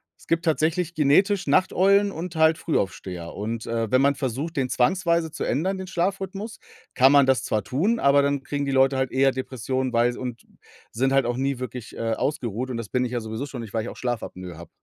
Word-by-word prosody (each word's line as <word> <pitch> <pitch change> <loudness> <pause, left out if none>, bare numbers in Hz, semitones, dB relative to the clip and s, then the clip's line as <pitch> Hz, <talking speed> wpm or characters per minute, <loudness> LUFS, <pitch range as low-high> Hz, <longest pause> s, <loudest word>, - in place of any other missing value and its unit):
Es - - -21
gibt 165 +1 0
tatsächlich 165 +2 +1
genetisch 180 +5 +3
Nachteulen 195 +5 +3
und 170 0 -6
halt 160 0 +4
Frühaufsteher. 95 - -3
Und, 110 +2 -4
äh, 115 -2 -2
wenn 130 +1 +4
man 140 0 +3
versucht, 140 +6 -3
den 130 -2 0
zwangsweise 170 +4 +1
zu - - -5
ändern, 185 +8 0
den 190 0 -6
Schlafrhythmus, 195 +4 -3 0.3
kann 130 +1 +5
man 140 -2 +6
das 130 -1 +2
zwar 105 -2 -1
tun, 170 - 0
aber 140 +1 +5
dann 140 -1 0
kriegen 145 0 -3
die 135 - -2
Leute 135 0 +3
halt 130 -1 -1
eher 135 +1 +3
Depressionen, 130 0 -3
weil 120 +1 +3
s - - -9
und 125 -2 -6 0.5
sind 135 +4 0
halt 135 -3 +3
auch 120 0 -1
nie 135 -1 -1
wirklich, 125 -2 -7
äh, 115 -1 -1
ausgeruht 125 -2 -2
und 120 - -3
das 115 -3 -6
bin 125 -1 0
ich 120 - -5
ja 120 - -1
sowieso 110 +5 -5
schon 130 -4 -7
nicht, 110 -2 -9
weil 110 -1 -1
ich - - -5
auch - - -10
Schlafapnoe 95 -8 -5
habe. 85 -1 -11
135 Hz, 225 wpm, -24 LUFS, 120-165 Hz, 0.5 s, man